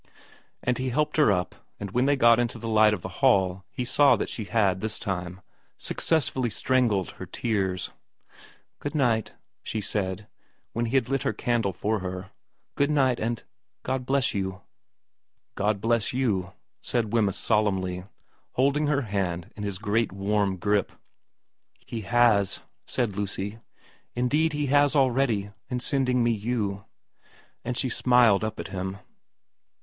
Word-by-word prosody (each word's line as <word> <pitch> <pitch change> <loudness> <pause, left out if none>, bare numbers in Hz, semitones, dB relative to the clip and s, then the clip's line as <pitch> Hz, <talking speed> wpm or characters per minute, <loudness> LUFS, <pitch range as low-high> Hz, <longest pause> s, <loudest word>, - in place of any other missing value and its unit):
And 125 0 0
he 130 0 -1
helped 150 +5 0
her 150 -8 +5
up, 90 -2 0 0.3
and 100 -2 -5
when 125 +5 +2
they 145 - +4
got 120 -3 +5
into 120 0 -1
the 115 - -6
light 110 -1 +5
of 90 - -11
the - - -3
hall 95 -8 +3
he 125 - -4
saw 140 +3 +5
that - - -3
she 110 - -4
had, 95 -2 +1
this 110 0 -2
time, 90 -2 -4 0.4
success 160 -3 +1
fully 130 -2 -1
strangled 110 -5 +1
her - - -9
tears. 95 -5 -1 0.4
' - - -24
Good 145 +1 -4
night,' 120 -7 +1 0.3
she 110 - -3
said, 100 -1 -3 0.5
when 120 +1 -1
he 120 - -2
had 130 -3 +3
lit 135 0 0
her - - 0
candle 120 -5 0
for 105 +4 -1
her, 95 +1 -6 0.2
' - - -49
good 140 +1 +2
night, 135 -5 +2
and 115 +1 -2 0.4
God 130 -1 -2
bless 140 0 +2
you.' 95 -2 -3 0.5
' - - -53
God 105 -1 +2
bless 115 +1 +1
you' 100 -8 0 0.3
said 115 -3 -1
Wemyss 105 -5 +2
solemnly, 95 -4 0 0.5
holding 140 +3 +2
her 145 -1 +1
hand 95 -5 -2
in 105 - -8
his 100 -2 -3
great 110 +2 0
warm 100 0 0
grip. 100 +2 +1 0.5
' - - -54
He 115 - -5
has,' 110 -2 +3 0.3
said 115 -6 -1
Lucy. 100 +1 -3 0.3
' - - -32
Indeed 150 +6 +1
He 150 0 -1
has 145 +1 +3
already, 125 -7 +2 0.2
in 125 - -1
sending 125 -1 +1
me 120 - +3
you.' 105 -3 -2 0.8
And 125 0 -3
she - - 0
smiled 120 -4 +4
up 110 0 -3
at - - -5
him. 95 0 -4
110 Hz, 165 wpm, -26 LUFS, 100-125 Hz, 0.8 s, her